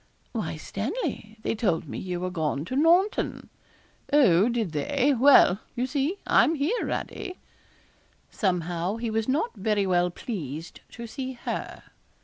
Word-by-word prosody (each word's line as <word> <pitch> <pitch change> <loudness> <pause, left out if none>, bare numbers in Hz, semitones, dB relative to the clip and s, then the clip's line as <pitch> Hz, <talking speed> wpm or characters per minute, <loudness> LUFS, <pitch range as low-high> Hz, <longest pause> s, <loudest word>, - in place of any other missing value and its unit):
'Why, - - -3
Stanley, 220 - -4
they - - 0
told 190 -9 0
me - - -5
you 180 -2 -4
were 185 0 -2
gone 155 -4 -1
to 255 - -4
Naunton.' 345 +8 +2 0.6
'Oh! 225 - +5
did 230 -7 -1
they? 265 - +1
Well, 255 -7 +6 0.2
you 245 0 0
see, 285 +7 -1
I'm 325 - +4
here, 320 - 0
Radie.' 370 -3 -4 0.9
Somehow 180 -1 -1
he 230 -1 -3
was 220 0 -1
not 320 - 0
very 205 0 0
well 180 -1 +2
pleased 165 - -6
to 235 - -7
see 260 +3 -5
her. 240 - -5
225 Hz, 140 wpm, -26 LUFS, 180-280 Hz, 0.9 s, Well